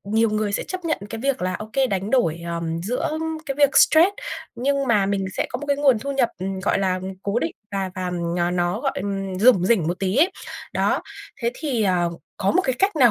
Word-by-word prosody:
nhiều 220 +2 +2
người 215 -1 -1
sẽ - - 0
chấp 370 -1 -6
nhận 320 -2 0
cái 225 - -5
việc 275 -5 0
là 185 0 -1
ô 215 +3 -7
kê, 270 -1 +3
đánh 195 -2 -2
đổi, 170 -11 +2
ờm, 170 -1 -3
giữa 245 +9 -1 0.4
cái 275 - -2
việc 285 -2 +4
stress 320 +4 +7 0.5
nhưng 280 +3 0
mà 210 -4 +3
mình 195 -1 0
sẽ - - 0
có 245 - -3
một 290 - -7
cái 285 0 +2
nguồn 275 -5 +4
thu 280 +6 -4
nhập, 265 -4 +2
ừm, 190 +1 -3
gọi 195 - +1
là, 185 -1 0 0.2
cố 200 +3 0
định 330 - -2 0.2
và 195 -1 -2
và 185 -1 -3
n 170 -1 -2 0.2
nó, 175 0 0
gọi, - - 0
ừm, 195 -1 -3
rủng 205 -4 +5
rỉnh 200 -7 +3
một 175 - -2
tí 195 +2 -1
ấy. 330 +7 +5 0.4
Đó, - - +1 0.4
thế 235 -1 +1
thì, 260 -7 -1
ờ, 180 -3 +2 0.3
có 195 -1 +1
một 370 - +3
cái 260 - +1
cách 390 -3 +2
nào 245 -6 +6
210 Hz, 240 wpm, -23 LUFS, 185-265 Hz, 0.5 s, stress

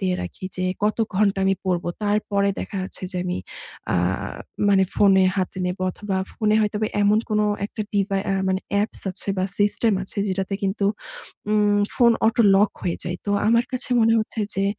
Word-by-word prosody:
দিয়ে 185 -2 0
রাখি 90 - -8
যে, 185 - -1 0.2
কত 215 - +1 0.2
ঘণ্টা 200 0 +2
আমি 195 0 +3
পড়বো। 180 -2 -1 0.2
তারপরে 205 -1 +1
দেখা - - -6
যাচ্ছে 185 - -7
যে, 180 - -3
আমি 180 0 -2 0.5
আ - - +2 0.7
মানে 195 -1 +5
ফোনে 195 -2 +5
হাতে 185 0 -2
নেব 180 +1 -3
অথবা 195 +1 -4 0.2
ফোনে 215 -1 +1
হয়তো 210 -1 0 0.3
এমন 205 +1 +4
কোনো 210 0 +2 0.2
একটা 215 - -5
ডিভা 200 -1 +1
আ - - +1
মানে 190 0 0
অ্যাপস 205 +2 +2
আছে 185 - -6
বা 185 - +1
সিস্টেম 205 +1 +2
আছে 195 +2 -7
যেটাতে 190 +1 -2
কিন্তু 195 +1 -1 0.7
উম 210 -1 +3 0.2
ফোন 235 -1 +5
অটো 225 +1 +3
লক 205 +2 +4
হয়ে 175 -2 -1
যায়। 175 0 -3
তো - - 0 0.2
আমার 235 +1 +4
কাছে 255 0 -3
মনে 225 0 +4
হচ্ছে 220 +1 -3
যে, 195 - 0
200 Hz, 185 wpm, -23 LUFS, 190-210 Hz, 0.7 s, মানে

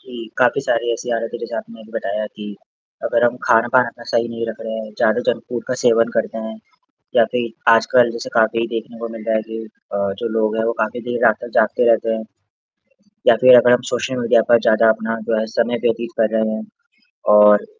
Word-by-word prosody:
जी, 120 -2 -10
काफ़ी 125 +2 +3
सारी 120 -2 -1
ऐसी 120 +1 -5
आदतें 115 +1 -4
जैसे - - -6
आपने 115 0 -8
अभी 110 0 -16
बताया 105 +2 -3
कि 105 -1 -8 0.5
अगर 120 0 +1
हम 120 +1 +1
खान-पान 120 +3 +3
अपना 120 0 -11
सही 115 0 0
नहीं 115 0 -5
रख 115 - -5
रहे 110 - -6
हैं, 110 -1 -6
ज़्यादा 110 +2 +2
जंक 115 - 0
फूड 120 -2 -4
का 130 - -1
सेवन 115 -1 +3
करते 115 0 -1
हैं 110 0 -6 0.6
या - - +6
फिर 120 -2 -2 0.2
आजकल 120 +1 +4
जैसे 115 - -6
काफ़ी 115 0 +2
देखने 115 +1 -6
को 115 0 -5
मिल 115 -1 -9
रहा 110 -1 +1
है 110 - -1
कि 110 +1 -8 0.3
अ, - - -2 0.2
जो 115 - -2
लोग 110 0 0
हैं 110 - 0
वो 115 - 0
काफ़ी 110 +3 -2
देर 120 0 -1
रात 110 - +4
तक 120 - -7
जागते 110 +2 +2
रहते 115 0 +1
हैं 110 - -4 1.0
या - - +7
फिर 125 0 +8
अगर 120 0 +5
हम 125 0 +3
सोशल 130 +2 -2
मीडिया 115 -1 +3
पर 120 - +6
ज़्यादा 110 +1 +4
अपना 115 +1 -3
जो 110 - +1
है 110 - -1
समय 120 +1 +1
व्यतीत 115 0 -1
कर 110 -1 +3
रहे 110 0 0
हैं 110 - -5 0.7
और 105 0 +6
115 Hz, 225 wpm, -19 LUFS, 110-120 Hz, 1.0 s, फिर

